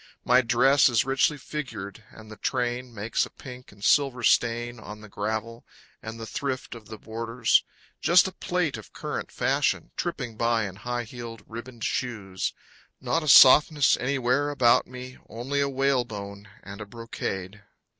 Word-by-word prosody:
My 125 +1 +5
dress 130 +3 +4
is 120 -2 +2
richly 135 +3 +2
figured, 120 -8 -7
And 110 -1 -14
the - - -8
train 125 +2 -2
Makes 110 +1 -1
a - - -19
pink 125 -1 -12
and 100 0 -16
silver 135 -2 +2
stain 120 0 +1
On 105 0 -10
the 110 - -11
gravel, 110 +3 -4 0.4
and 110 +1 -8
the 115 - -6
thrift 130 +2 -4
Of 115 -4 -12
the 110 +1 -8
borders. 115 +3 0 0.4
Just 175 +2 +5
a - - -5
plate 180 -8 -2
of 110 - -13
current - - -5
fashion, - - 0
Tripping 120 -3 -4
by 115 -1 +1
in 95 0 -10
high 120 +3 -3
heeled, 115 -1 -9
ribboned 115 0 -9
shoes. 105 -7 -2 0.5
Not 165 - 0
a 155 - -6
softness 145 +2 +7
anywhere 135 +2 0
about 125 -5 +3
me, 125 0 -10
Only 125 +6 -3
a 140 - +1
whale 135 -1 +1
bone 100 -2 -9
and 100 +1 -9
brocade. 105 -3 -6
120 Hz, 160 wpm, -26 LUFS, 110-130 Hz, 0.5 s, softness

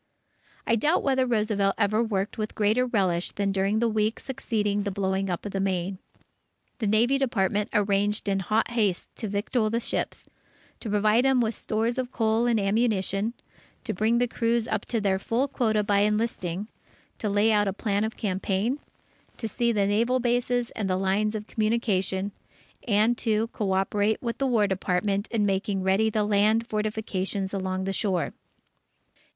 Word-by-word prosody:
I 230 - +3
doubt 300 +10 +2
whether 265 -2 +2
Roosevelt 210 -4 +1
ever 215 +1 +2
worked 210 -2 -2
with 215 0 -3
greater 220 +4 +2
relish 185 -7 0
than 200 -1 0
during 195 +2 +1
the 235 +1 +2
weeks 215 0 0
succeeding 215 -6 -1
the 200 - -2
blowing 190 0 -1
up 175 +2 -3
of 205 - -4
the 195 - -2
Maine. 190 -1 -1 0.8
The 220 - -1
Navy 235 +6 +3
Department 210 -5 0
arranged 205 +1 +1
in 195 -1 +1
hot 215 +5 0
haste 210 -7 -1
to 220 - -4
victual 215 +3 0
the 230 +2 0
ships; - - -3 0.5
to 225 - -5
provide 215 +3 +3
them 265 -1 +4
with 230 -1 +1
stores 225 +4 -1
of 255 0 -3
coal 225 0 +1
and 230 -2 +2
ammunition; 205 +1 0 0.5
to - - -2
bring 220 +5 +2
the 245 +1 +2
crews 230 0 0
up - - -2
to 235 - -1
their 195 -2 +1
full 235 +7 0
quota 220 -6 +1
by 200 -1 +2
enlisting; 210 -3 -1 0.5
to 215 - -1
lay 205 +2 +3
out 205 -1 +3
a - - +1
plan 205 0 -1
of 220 +1 -3
campaign; 200 +6 -1 0.6
to 225 - -3
see 235 +3 -1
to - - -2
the 200 -1 +2
naval 230 +6 +2
bases 245 0 0
and 205 -3 -3
the 185 - +1
lines 200 +3 0
of 210 -1 -4
communication; 205 -4 0 0.6
and 220 +2 +3
to 220 0 +1
coöperate 205 +1 0
with 235 -2 -4
the 275 - +1
War 230 -5 +3
Department 195 +1 0
in 215 -3 +1
making 195 0 -1
ready 195 +4 +3
the 215 -1 0
land 210 +2 +2
fortifications 210 -3 -2
along 190 -1 -2
the 195 0 -2
shore. 190 -3 0
210 Hz, 175 wpm, -26 LUFS, 195-230 Hz, 0.8 s, them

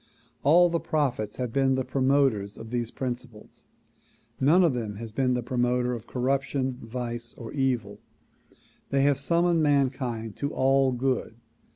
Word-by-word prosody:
All 170 +5 +6
the 170 -1 0
prophets 140 -10 -1
have 125 -3 -4
been 135 -1 +3
the 130 -1 -1
promoters 130 -6 +1
of 115 0 -9
these 120 -2 -2
principles; 120 -4 -7 0.7
none 160 +8 +5
of 165 -6 +3
them 110 -4 -4
has 115 +1 -7
been 125 +2 +1
the 125 - -2
pro 125 +2 -4
moter 125 0 +1
of 115 - -9
corruption, 130 0 -1
vice 120 0 -5
or 115 -2 -9
evil. 125 -7 -1 0.9
They 135 0 +2
have 140 -1 +3
summoned 170 +3 +2
mankind 130 -6 0
to 140 +1 -2
all 135 0 +3
good. 125 -2 -1
130 Hz, 155 wpm, -27 LUFS, 120-140 Hz, 0.9 s, All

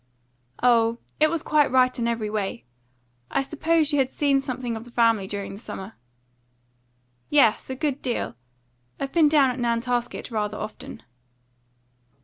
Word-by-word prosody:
"Oh, 230 -2 +4 0.2
it 310 0 +5
was 330 -1 -2
quite 300 -2 +3
right 255 0 +3
in 235 - 0
every 230 -2 -1
way. 195 - -3 0.6
I - - 0
suppose 310 +1 +1
you 290 - +3
have 260 -1 +2
seen 275 -1 +1
something 255 -3 -4
of 220 - -6
the 245 - -14
family 230 -4 +2
during 200 0 -5
the 200 - -9
summer." 205 -2 -8 1.4
"Yes, 270 -7 +3
a 260 - -3
good 285 0 -2
deal. 245 -3 -2 0.7
I've 275 0 -3
been 320 -3 +4
down 285 -4 +4
at 250 - -6
Nantasket 240 +1 -1
rather 210 -1 -2
often." 215 - -8
250 Hz, 150 wpm, -24 LUFS, 225-280 Hz, 1.4 s, it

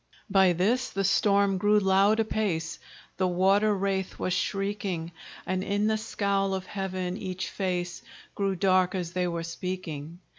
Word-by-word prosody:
By 190 -2 +5
this 230 +9 +1
the 195 - -2
storm 200 0 +3
grew 210 +2 +4
loud 195 +2 +3
apace, 205 -7 -1 0.4
The 185 0 +2
water 195 +4 +3
wraith 190 -1 -2
was 185 - -1
shrieking; 195 -5 -2 0.3
And 185 0 -1
in 205 +1 0
the 220 0 +2
scowl 200 -3 0
of 190 0 -4
heaven 185 -2 -3
each 185 -1 -4
face 180 -2 -2 0.3
Grew 195 -1 -1
dark 185 0 +2
as 175 -2 -3
they 180 0 0
were 170 -1 -3
speaking. 165 -3 -5
190 Hz, 150 wpm, -27 LUFS, 180-200 Hz, 0.4 s, By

